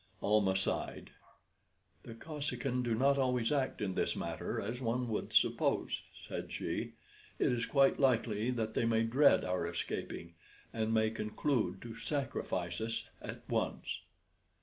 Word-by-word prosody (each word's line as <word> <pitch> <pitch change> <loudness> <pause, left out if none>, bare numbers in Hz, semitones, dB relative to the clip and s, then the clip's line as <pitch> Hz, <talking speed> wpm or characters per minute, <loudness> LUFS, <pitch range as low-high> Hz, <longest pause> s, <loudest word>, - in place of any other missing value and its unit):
Almah 100 -2 +3
sighed. 95 - -2 0.9
"The 115 - -9
Kosekin 135 -3 -2
do 120 -2 +1
not 140 +4 +3
always 125 -2 +2
act 140 -3 0
in 95 -2 -1
this - - 0
matter - - -3
as 115 +5 -4
one 125 +1 0
would 110 - -2
suppose," - - +2 0.3
said - - -5
she. - - -3 0.4
"It - - +3
is 120 -1 0
quite 135 -1 +4
likely 115 -4 +2
that 110 -3 -1
they 115 - +1
may 115 0 +3
dread 130 +6 +5
our 90 -2 0
escaping, 85 0 -4 0.4
and 110 0 0
may 110 -1 +3
conclude 110 -3 -1
to 115 -1 -7
sacrifice 120 - -2
us 115 +1 -2 0.2
at - - -8
once." - - -1
115 Hz, 145 wpm, -34 LUFS, 110-130 Hz, 0.9 s, dread